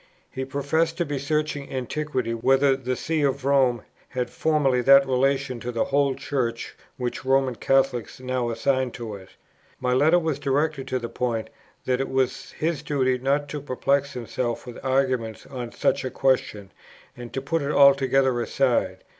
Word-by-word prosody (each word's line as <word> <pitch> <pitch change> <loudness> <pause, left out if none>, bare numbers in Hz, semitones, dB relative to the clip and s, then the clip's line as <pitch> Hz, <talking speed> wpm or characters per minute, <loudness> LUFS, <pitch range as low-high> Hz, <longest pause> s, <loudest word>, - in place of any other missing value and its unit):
He 130 0 -4
professed 160 +5 0
to 175 - 0
be 145 -2 -3
searching 150 0 -2
Antiquity 130 -1 -2
whether 135 +4 +3
the 130 -1 -3
see 160 +4 -1
of 135 -2 0
Rome 130 -5 +3 0.3
had 125 -1 -3
formerly 145 -5 +1
that 140 +2 +7
relation 135 -1 0
to 120 +2 -4
the 115 - 0
whole 140 -1 +1
Church 120 -5 -3 0.2
which 125 -1 -4
Roman 135 -1 +2
Catholics 135 -1 0
now 130 -1 -2
assign 130 +3 0
to 115 -3 -6
it. 95 -2 -10 0.5
My 125 0 0
letter 150 +7 +4
was 160 -4 -1
directed 140 0 0
to 130 - -1
the 120 -2 -4
point, 115 -2 -3 0.3
that 130 0 +1
it 135 - -3
was 130 -1 -1
his 160 -1 -2
duty 130 -3 0
not 140 +3 0
to 150 0 -5
perplex 140 +1 0
himself 120 0 -3
with 125 -2 -10
arguments 130 -4 0
on 125 -3 -6
[such] 140 - 0
a 130 - -2
question,... 105 -8 0 0.4
and 120 -1 -9
to - - -1
put 160 +4 -1
it 140 +1 -1
altogether 135 -3 +4
aside.... 125 +1 0
135 Hz, 170 wpm, -24 LUFS, 125-140 Hz, 0.5 s, that